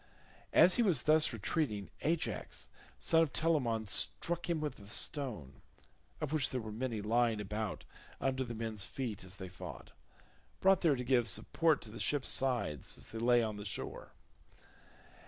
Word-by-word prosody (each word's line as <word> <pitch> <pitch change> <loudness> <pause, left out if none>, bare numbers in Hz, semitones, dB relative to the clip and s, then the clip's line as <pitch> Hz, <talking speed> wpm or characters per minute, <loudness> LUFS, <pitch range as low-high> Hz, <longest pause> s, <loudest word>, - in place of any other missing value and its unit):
As 185 - +7
he - - +4
was 180 - +3
thus 155 -1 +5
retreating, 110 - -2
Ajax 165 +1 -2 0.3
son 165 - +3
of 160 -4 +1
Telamon, 130 -9 +1
struck 170 - -2
him 170 -2 +1
with 150 -5 -4
a 100 - -13
stone, 105 - -2 0.6
of 155 -1 -3
which 150 -4 +3
there 130 - -2
were 110 -2 -6
many 115 -1 -3
lying 115 0 +2
about 105 0 -4 0.3
under 130 -1 0
the 120 -2 -6
men's 110 -3 -1
feet 115 -2 -4
as 95 +1 -8
they 95 -2 -7
fought—brought 185 - -3
there 160 -5 +4
to 125 - -4
give 120 -2 +2
support 160 -3 +2
to 110 - -9
the 115 - -8
ships' 145 -3 0
sides 125 - +1
as - - -9
they 115 - -6
lay 120 0 +4
on 110 -2 -3
the 105 - -6
shore. 100 - -5
120 Hz, 165 wpm, -34 LUFS, 110-150 Hz, 0.6 s, As